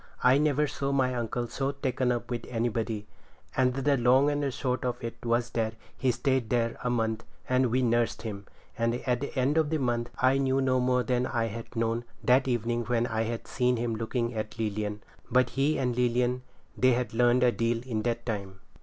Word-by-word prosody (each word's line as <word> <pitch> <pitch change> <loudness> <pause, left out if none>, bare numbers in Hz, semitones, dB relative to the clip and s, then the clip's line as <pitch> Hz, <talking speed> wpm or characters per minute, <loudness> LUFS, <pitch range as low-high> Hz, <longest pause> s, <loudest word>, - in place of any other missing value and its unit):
I 130 +2 +6
never 150 0 +2
saw 140 -1 -2
my 130 -2 +2
uncle 120 0 -2
so 135 +3 -2
taken 130 -2 0
up 120 +1 -3
with 120 - -3
anybody; 115 -2 -1 0.5
and 125 -1 +2
the 140 +1 +2
long 130 +4 +4
and 145 0 -1
the 140 - 0
short 130 -1 -2
of 125 -2 -2
it 115 - -6
was 120 +1 0
that 110 -1 -1 0.2
he 130 - 0
stayed 130 -2 0
there 115 -2 +1
a 125 - 0
month, 115 -2 0 0.2
and 130 0 +3
we 130 +3 +1
nursed 120 -1 +1
him; 100 -3 -6 0.3
and 115 0 +1
at 125 -1 +1
the 140 - -3
end 140 +5 +3
of 155 -2 +1
the 160 - +1
month 120 -3 -1
I 130 +1 +4
knew 135 0 +2
no 130 -1 +2
more 125 0 +2
than 125 +2 0
I 115 -2 0
had 115 +2 -7
known 115 +1 0 0.2
that 130 +2 +4
evening 120 -1 0
when 120 0 +1
I 110 -2 -1
had 115 0 -4
seen 125 -1 +1
him 115 0 -1
looking 115 +2 -2
at 110 0 -4
Lilian; 105 -1 -2 0.3
but 125 0 +3
he 140 +4 +1
and 125 -3 0
Lilian, 125 +1 +1 0.3
they 130 0 +4
had 125 -1 -1
learned 120 +2 +4
a 125 - +5
deal 115 0 -1
in 110 -4 -1
that 120 0 -2
time. 100 -4 -4
120 Hz, 210 wpm, -28 LUFS, 115-130 Hz, 0.5 s, I